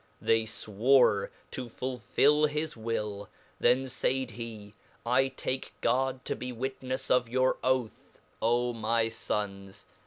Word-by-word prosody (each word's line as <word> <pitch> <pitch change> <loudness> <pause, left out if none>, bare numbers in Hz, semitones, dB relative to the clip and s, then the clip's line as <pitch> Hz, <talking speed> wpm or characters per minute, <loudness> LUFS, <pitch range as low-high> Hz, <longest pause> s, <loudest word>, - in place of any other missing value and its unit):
They 115 0 +2
fwore 110 -1 +3 0.2
to 125 -2 -5
fulhll 140 +5 +2
his 150 +1 -3
will; 105 -3 -3 0.3
then 130 +2 +3
faid 130 0 -1
he, 110 -2 -8 0.3
I 125 +3 +3
take 130 0 -4
God 130 +2 +1
tobe - - -3 0.2
witnefsofyour 130 -1 0
oath: 130 -3 -1 0.2
Omyfons 110 -4 -1
120 Hz, 95 wpm, -30 LUFS, 110-130 Hz, 0.3 s, fwore